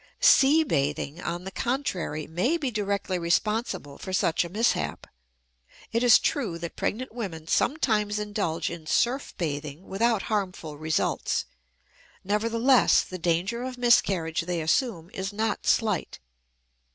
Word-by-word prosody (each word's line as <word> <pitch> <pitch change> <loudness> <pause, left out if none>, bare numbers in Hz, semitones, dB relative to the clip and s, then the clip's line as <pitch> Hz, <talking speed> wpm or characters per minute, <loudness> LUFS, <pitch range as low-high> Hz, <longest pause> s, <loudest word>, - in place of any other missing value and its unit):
Sea 320 - +6
bathing, 145 - -1
on 175 +1 -4
the 190 - -6
contrary, 190 - -2
may 190 - 0
be 280 -6 -2
directly 200 -3 -1
responsible 170 - -1
for 190 - -6
such 170 -2 +2
a 170 - -7
mishap. 220 +6 0 0.9
It 230 - +1
is 245 -2 +7
true 225 - -1
that 170 0 -6
pregnant 255 +2 -3
women 185 -10 -5
sometimes 210 - +1
indulge 205 -6 -2
in 165 -2 -8
surf 255 - 0
bathing 150 -2 -4
without 220 +2 +1
harmful 185 -8 -3
results; 155 +2 -1 0.8
nevertheless 230 +3 +3
the 185 - -8
danger 175 +8 0
of 255 0 -5
miscarriage 190 -9 +2
they 175 0 -2
assume 170 - 0
is 190 +1 -4
not 215 +1 -2
slight. 215 -7 +1
200 Hz, 130 wpm, -26 LUFS, 170-235 Hz, 0.9 s, is